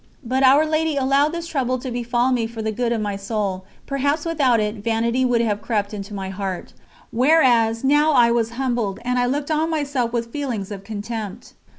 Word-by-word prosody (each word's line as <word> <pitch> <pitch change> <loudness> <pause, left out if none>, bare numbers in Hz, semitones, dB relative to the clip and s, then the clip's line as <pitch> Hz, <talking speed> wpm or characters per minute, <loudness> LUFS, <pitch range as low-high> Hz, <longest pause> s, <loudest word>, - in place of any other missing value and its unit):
But 260 +2 0
Our 275 +4 +6
Lady 310 -1 0
allowed 275 +2 +2
this 335 0 -4
trouble 260 -6 -1
to 255 0 -6
befall 240 +1 0
me 235 -3 +1
for 225 -1 -7
the 220 - -1
good 235 +2 -1
of 230 -2 0
my 205 -1 -2
soul; 195 -2 -3 0.2
perhaps 285 +3 -1
without 280 -8 +2
it 210 +1 -1
vanity 230 +4 0
would 245 -2 +2
have 210 -3 -1
crept 210 -2 -2
into 200 0 -6
my 190 -1 -4
heart, 190 -1 -5 0.4
whereas 240 -4 +3
now 295 +3 +4
I 235 -3 +5
was 230 -1 +1
humbled, 240 -7 -1
and 250 0 +1
I 245 - +2
looked 285 +4 -2
on 315 +1 +1
myself 280 -6 -1
with 230 -1 -3
feelings 235 -9 -4
of 195 -1 -7
contempt. 215 0 -6
240 Hz, 200 wpm, -21 LUFS, 220-275 Hz, 0.4 s, Our